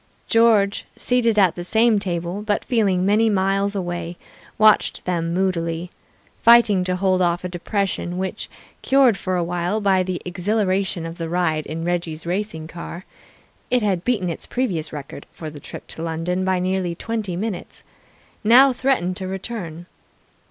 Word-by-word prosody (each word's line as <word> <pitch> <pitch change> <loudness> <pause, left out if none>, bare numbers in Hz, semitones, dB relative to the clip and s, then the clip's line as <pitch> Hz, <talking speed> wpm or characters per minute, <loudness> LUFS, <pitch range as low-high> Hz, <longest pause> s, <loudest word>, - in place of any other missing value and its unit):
George, 220 -3 +3
seated 235 -3 +1
at 190 -5 +5
the 175 - -6
same 220 +3 +3
table, 175 0 -3
but 210 -1 -1
feeling 200 -7 +1
many 215 +3 +3
miles 195 0 +1
away, 175 -2 -4 0.4
watched 215 0 +4
them 170 -2 -1
moodily, 175 -2 -1 0.5
fighting 230 -5 +6
to 180 0 -1
hold 185 0 +1
off 175 0 +1
a - - -2
depression 180 0 -2
which, 190 0 -4 0.3
cured 265 -5 +4
for 185 -1 -2
a 175 - +1
while 175 +4 -1
by 195 -3 +3
the 185 -1 -2
exhilaration 190 -1 0
of 165 +1 -7
the 165 -1 -3
ride 160 -3 0
in 160 +1 -4
Reggie's 170 -2 -2
racing 175 -3 -3
car 170 +2 -8 0.6
(it 250 -2 +2
had 190 -4 0
beaten 215 -6 0
its 165 - -8
previous 200 -12 -2
record 145 -1 -8
for 155 -2 -8
the 145 - -10
trip - - -10
to - - -7
London 165 +3 -2
by 190 0 +1
nearly 180 -1 -1
twenty 215 -3 -3
minutes), 200 0 -5 0.6
now 255 +5 +7
threatened 245 -9 0
to 190 - -4
return. 190 -4 -6
185 Hz, 160 wpm, -22 LUFS, 175-210 Hz, 0.6 s, now